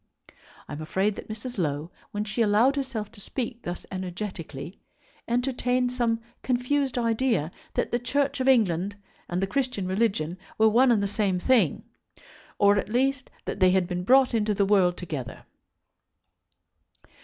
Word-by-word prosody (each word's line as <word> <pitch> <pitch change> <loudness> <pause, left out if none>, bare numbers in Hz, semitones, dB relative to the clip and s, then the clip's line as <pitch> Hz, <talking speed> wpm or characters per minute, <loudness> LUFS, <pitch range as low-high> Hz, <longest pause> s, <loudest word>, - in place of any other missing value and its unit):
I - - -7
am 145 - -6
afraid 190 +6 0
that - - -9
Mrs. 225 +1 -6
Low, 150 0 -2 0.2
when 205 0 -3
she 215 +3 -2
allowed 225 +6 +4
herself 260 -7 -3
to 220 -4 -13
speak 240 +1 -4
thus 175 -3 -6
energetically, 180 -4 -6 0.5
entertained 250 0 0
some 235 -2 0 0.2
confused 260 +1 0
idea 230 - +1 0.2
that - - 0
the 240 - +1
Church 280 +3 0
of 260 - 0
England 200 -6 +3 0.3
and 180 +2 -1
the - - +3
Christian 240 -2 -1
religion 185 -4 0 0.2
were 220 0 +5
one 245 +4 +5
and 210 -4 +3
the - - +1
same 200 -2 0
thing, 205 - +2 0.7
or, 200 0 +5
at 200 - -4
least, 270 +4 0 0.2
that - - -4
they 185 -1 +6
had 185 0 +3
been 180 -1 -3
brought 260 +4 +5
into 215 -2 +1
the 200 - +2
world 190 -3 +3
together. 150 -9 -6
215 Hz, 155 wpm, -26 LUFS, 185-250 Hz, 0.7 s, they